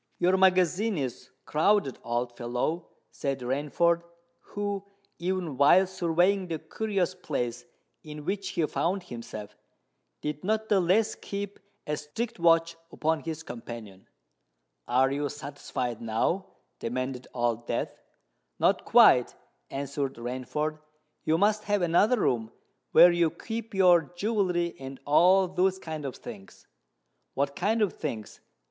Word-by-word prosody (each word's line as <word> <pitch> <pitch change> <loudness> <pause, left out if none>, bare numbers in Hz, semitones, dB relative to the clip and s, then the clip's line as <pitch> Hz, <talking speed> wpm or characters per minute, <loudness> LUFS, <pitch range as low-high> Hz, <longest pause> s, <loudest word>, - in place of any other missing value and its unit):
"Your 180 +2 +3
magazine 190 +2 +3
is 130 -4 -4 0.2
crowded, 160 -2 +2
old 120 +1 -2
fellow," 125 +8 -2 0.2
said 135 -2 -3
Rainford, 150 +7 +1 0.4
who, 205 -1 -4 0.4
even 175 -5 -2
while 145 +7 +6
surveying 185 +1 +1
the 165 -2 -2
curious 195 0 -2
place 125 -9 -3 0.4
in 150 -1 -9
which 195 +2 -2
he 165 - 0
found 180 +5 -1
himself, 115 - -8 0.7
did 150 0 -3
not 220 +2 0
the 205 - +4
less 190 +5 +3
keep 200 0 -6 0.3
a 150 - -1
strict 220 +9 -5
watch 165 0 +4 0.2
upon 160 0 0
his 160 0 -5
companion. 115 - -9 0.8
"Are 130 +2 +3
you 145 +1 -1
satisfied 135 -4 -5
now?" 115 - 0 0.3
demanded 130 +1 -3
Old 120 -1 -1
Death. - - -2 0.6
"Not - - +2
quite," - - +6 0.3
answered 140 0 -3
Rainford. 130 +6 -3 0.5
"You 160 - +3
must 210 +3 +2
have 205 -2 +1
another 200 +8 +3
room 115 -2 0 0.4
where 175 - +8
you 175 -1 +3
keep 225 +4 -6
your 175 -5 +5
jewellery 180 -4 0
and 135 0 -8
all 185 +6 +5
those 185 +1 +1
kinds 155 -5 -5
of 130 - -6
things?" 95 0 -11 0.7
"What 140 0 0
kind 215 +4 +1
of 200 - 0
things?" 115 -9 -5
165 Hz, 130 wpm, -28 LUFS, 135-190 Hz, 0.8 s, where